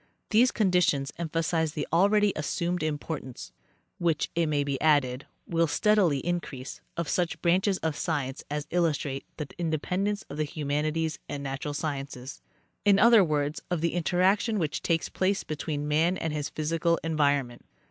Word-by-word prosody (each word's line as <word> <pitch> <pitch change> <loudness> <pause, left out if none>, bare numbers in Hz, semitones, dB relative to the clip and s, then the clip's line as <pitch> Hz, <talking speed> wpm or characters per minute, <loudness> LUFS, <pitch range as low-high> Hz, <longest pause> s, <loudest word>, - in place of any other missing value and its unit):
These 240 +3 +5
conditions 180 -11 +2
emphasize 160 -1 0
the 150 -3 -3
already 205 +3 +4
assumed 170 +4 -1
importance, 150 -4 -4 0.5
which, 165 -3 0
it 170 -1 +1
may 145 -1 +1
be 140 -2 -3
added, 140 -4 +2 0.2
will 165 -1 +1
steadily 180 -5 +2
increase, 170 -7 -4 0.2
of 170 -2 -1
such 175 +1 0
branches 185 +3 +3
of 160 -2 0
science 145 -6 -2
as 150 0 -3
illustrate 150 -5 0
the 150 - -4
interdependence 180 +6 -1
of 145 - -9
the 155 - +1
humanities 155 +1 -2
and 140 -1 -4
natural 140 +2 -4
sciences. 135 -4 -5 0.4
In 205 -1 +5
other 230 -1 +7
words, 150 -2 -1
of 175 -3 -1
the 170 - 0
interaction 190 +6 +2
which 160 -6 -1
takes 165 -2 0
place 190 +1 0
between 150 -1 -3
man 165 +5 +2
and 160 -2 -2
his 150 -1 -2
physical 165 +2 0
environment. 145 -6 0
160 Hz, 150 wpm, -28 LUFS, 145-175 Hz, 0.5 s, other